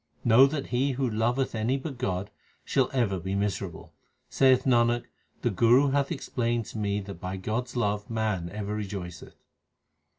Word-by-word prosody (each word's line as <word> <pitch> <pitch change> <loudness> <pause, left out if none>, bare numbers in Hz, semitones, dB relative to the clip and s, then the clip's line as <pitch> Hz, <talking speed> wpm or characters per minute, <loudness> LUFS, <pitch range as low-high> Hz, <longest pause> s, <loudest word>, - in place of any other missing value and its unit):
Know 120 +3 +7
that 140 -1 -3
he 130 +3 +1
who 130 0 0
loveth 120 +4 0
any 115 +4 0
but 135 -2 -6
God, 95 -5 -2 0.3
shall 135 -2 +2
ever 115 -8 0
be 95 +3 -3
miserable. 100 -4 -3 0.4
Saith 130 -1 +4
Nanak, 120 -2 +3 0.4
the - - +2
Guru 120 +8 +4
hath 140 +1 +1
explained 120 -6 -1
to 110 - -7
me 100 -1 0
that 100 -3 -9
by 95 +1 -4
God 110 +6 -2
s - - -13
love 105 -3 -1
man 110 -6 -1
ever 105 +1 -4
rejoiceth. 95 -5 -6
115 Hz, 165 wpm, -27 LUFS, 100-130 Hz, 0.4 s, Know